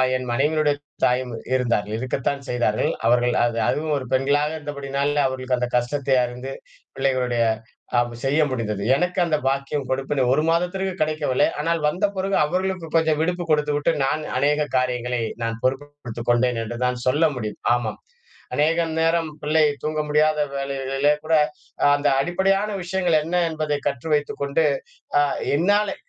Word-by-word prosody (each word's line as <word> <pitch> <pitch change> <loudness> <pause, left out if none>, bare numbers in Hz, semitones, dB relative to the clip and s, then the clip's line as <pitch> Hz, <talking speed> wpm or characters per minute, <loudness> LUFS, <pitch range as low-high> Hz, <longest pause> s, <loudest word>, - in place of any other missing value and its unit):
என் 130 0 -3
மனைவியினுடைய 150 +3 +2 0.3
தாயும் 125 -1 +1 0.2
இருந்தார்கள். 110 -4 0
இருக்கத்தான் 130 +3 -2
செய்தார்கள். 120 -3 +1 0.2
அவர்கள் 120 +1 +3
அது 120 -1 0
அதுவும் 155 0 -1
ஒரு 130 - -5
பெண்களாக 140 +3 +2
இருந்தபடியினால 145 0 -1
அவர்களுக்கு 130 -1 -2
அந்த 125 - -1
கஷ்டத்தை 135 +2 +1
அறிந்து 125 +2 -5 0.4
பிள்ளைகளுடைய 125 -3 +1 0.6
அம் 120 0 -1
செய்ய 140 +3 +2
முடிந்தது. 105 -5 -2
எனக்கு 180 +4 0
அந்த 155 -3 +1
பாக்கியம், 140 +1 -1
கொடுப்பினை 135 +1 0
1 150 - +2
மாதத்திற்கு 180 +3 0
கிடைக்கவில்லை. 155 -4 +1
ஆனால் 165 +2 0
வந்த 175 +6 +1
பிறகு 195 +1 -1
அவர்களுக்கு 185 0 -2
கொஞ்சம் 160 -2 +3
விடுப்பு 175 +1 -1
கொடுத்துவிட்டு, 150 0 +2
நான் 150 +3 0 0.2
அநேக 145 +2 +2 0.2
காரியங்களை 125 -1 -1 0.2
நான் 115 0 -2
பொறுப்பு 135 +3 0 0.2
எடுத்துக் 115 +1 -5
கொண்டேன் 120 0 +2
என்று 120 +2 -6
தான் 125 0 0
சொல்ல 150 +6 +3
முடியும். 110 -4 -5
ஆமாம். 120 -3 -3 0.6
அநேக 160 +3 +2 0.2
நேரம் 165 0 +2
பிள்ளை 155 +1 +3 0.2
தூங்க 155 0 -1
முடியாத 150 +1 +2 0.2
வேளைகளிலே 135 +1 0
கூட 160 0 +2 0.6
அந்த 145 - 0
அடிப்படையான 195 +6 +1
விஷயங்கள் 180 -2 +1
என்ன 170 +3 -3
என்பதை 155 -2 -1
கற்று 140 +2 -3
வைத்துக் 145 -1 -1
கொண்டு, 140 +3 +1 0.6
அ - - +5 0.3
என்னாலே 205 +6 +2
140 Hz, 145 wpm, -23 LUFS, 125-155 Hz, 0.6 s, அ